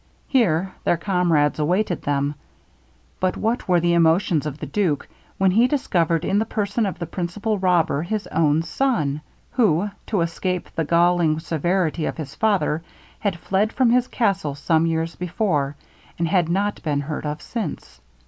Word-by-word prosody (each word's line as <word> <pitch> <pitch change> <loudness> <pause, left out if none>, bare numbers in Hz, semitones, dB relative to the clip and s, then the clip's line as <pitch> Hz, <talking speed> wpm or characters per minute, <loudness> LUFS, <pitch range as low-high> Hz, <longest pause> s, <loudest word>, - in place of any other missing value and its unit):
Here 190 - +2
their 175 - +2
comrades 170 -6 +1
awaited 175 +4 0
them; 145 0 0 0.9
but 185 0 0
what 225 +3 -1
were 180 -2 +4
the 170 0 +2
emotions 165 -1 +3
of 145 -1 -5
the - - -6
duke, 175 -9 -1 0.3
when 190 -1 +3
he 230 +6 +4
discovered 175 - +1
in 200 - +2
the 220 - +1
person 210 +1 -1
of 190 - -4
the 170 - -4
principal 190 +5 -2
robber 175 -6 +2
his 210 +5 -3
own 155 0 +2
son! 160 - 0 0.3
who, 205 -5 +2 0.2
to 205 -5 0
escape 180 +2 -2
the 160 - -1
galling 170 -1 +3
severity 165 0 0
of - - -4
his 150 -3 -6
father, 195 -7 +1 0.4
had 200 -5 -1
fled 195 +5 0
from 255 -3 +3
his 250 +1 +3
castle 195 - 0
some 160 +2 +2
years 165 0 -1
before, 175 - -1 0.4
and 170 - 0
had 175 -1 +2
not 200 +4 0
been 145 -3 -1
heard 150 +1 -4
of 150 +1 -3
since. 215 -6 -6
175 Hz, 165 wpm, -22 LUFS, 160-200 Hz, 0.9 s, were